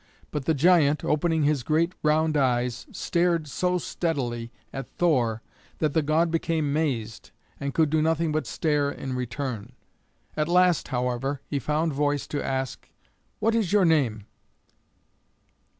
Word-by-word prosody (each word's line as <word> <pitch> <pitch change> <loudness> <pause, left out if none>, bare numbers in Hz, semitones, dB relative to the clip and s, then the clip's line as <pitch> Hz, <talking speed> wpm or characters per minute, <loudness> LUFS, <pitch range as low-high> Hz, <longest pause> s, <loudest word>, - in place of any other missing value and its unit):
But 145 -3 -3
the 160 - +2
giant, 155 -1 +4
opening 160 +1 +1
his 145 -2 +2
great 160 +7 +1
round 155 +1 +2
eyes, 125 -3 0
stared 170 -2 0
so 180 +6 0
steadily 125 -10 -3 0.2
at 135 0 -6
Thor 120 -10 +1 0.3
that 155 -3 0
the 160 - +3
god 160 +3 +2
became 160 -3 0
mazed 125 -8 -2 0.3
and 140 0 -2
could 155 -3 +3
do 155 -1 +3
nothing 160 0 +1
but 155 0 -1
stare 150 -3 0
in 135 -2 -5
return. 125 -2 -4 0.6
At 150 0 0
last, 180 -1 +3
however, 125 +2 -2
he 145 - -2
found 150 +4 0
voice 145 0 0
to 145 - -2
ask, 130 -1 -3 0.5
"What 225 +1 +1
is 220 -6 +1
your 205 -2 +4
name?" 130 -11 +2
150 Hz, 145 wpm, -26 LUFS, 130-165 Hz, 0.6 s, giant